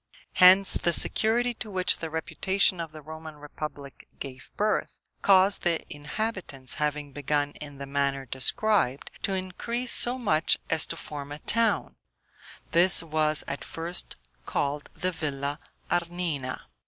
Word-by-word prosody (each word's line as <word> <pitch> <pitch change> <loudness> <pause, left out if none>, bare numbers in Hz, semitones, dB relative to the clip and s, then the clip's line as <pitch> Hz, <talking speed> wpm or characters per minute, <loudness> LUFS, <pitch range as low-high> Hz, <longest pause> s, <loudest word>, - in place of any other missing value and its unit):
Hence, 185 +2 +7
the 170 - +2
security 240 +7 +3
to 220 -1 -8
which 185 -2 0
the 165 - -5
reputation 185 +4 +1
of 165 -2 -5
the 155 -1 -12
Roman 160 0 -9
republic 145 -1 -9
gave 130 -2 -8
birth, 210 +1 -1 0.2
caused 195 0 +5
the 170 -2 0
inhabitants, 150 - -3
having 150 -1 -2
begun 145 +1 -1
in 145 -2 -8
the 140 - -6
manner 140 -1 -1
described, 135 - +1
to 195 - -1
increase 230 +7 -2
so 245 +2 +5
much 165 -10 +3
as 160 -1 +4
to 165 - -5
form 145 -2 -8
a 145 - -6
town, 225 +6 0 0.7
this 175 +1 +4
was 155 -1 +1
at 140 - -4
first 170 +2 -4 0.3
called 145 +1 -2
the 185 - -1
Villa 145 -3 -4 0.3
Arnina. 170 -6 -2
160 Hz, 140 wpm, -27 LUFS, 145-190 Hz, 0.7 s, Hence